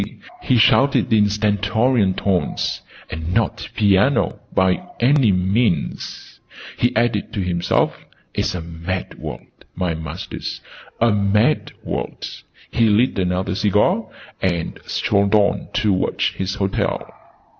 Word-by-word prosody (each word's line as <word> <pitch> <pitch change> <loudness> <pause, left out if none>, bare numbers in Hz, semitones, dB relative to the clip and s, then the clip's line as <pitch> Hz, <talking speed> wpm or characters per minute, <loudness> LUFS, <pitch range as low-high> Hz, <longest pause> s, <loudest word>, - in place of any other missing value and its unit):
he 125 - +2
shouted 130 +2 +4
in 105 -2 +4
stentorian 105 +1 +1
tones. 95 -3 -1 0.3
"And 80 +3 -4
not 115 -4 0
piano, 105 +5 +3
by 95 -1 +2 0.2
any 130 -2 +4
means!" 95 +3 -1 0.4
he 120 - +1
added 120 +1 +1
to 105 - -3
himself. 85 -1 0 0.3
"It's 95 - -1
a 90 - -3
mad 85 +3 -5
world, - - -7 0.3
my 90 -2 -1
masters, 80 0 -6 0.4
a 115 0 +4
mad 105 +7 +2
world!" - - -4 0.4
He 115 -1 +3
lit 105 +1 +2
another 90 0 0
cigar, 105 - +2 0.3
and 85 -3 -1
strolled 100 0 +1
on 105 -1 +2
towards 100 -4 +1
his 95 +1 -4
hotel. 95 -2 -1
100 Hz, 115 wpm, -20 LUFS, 95-110 Hz, 0.4 s, shouted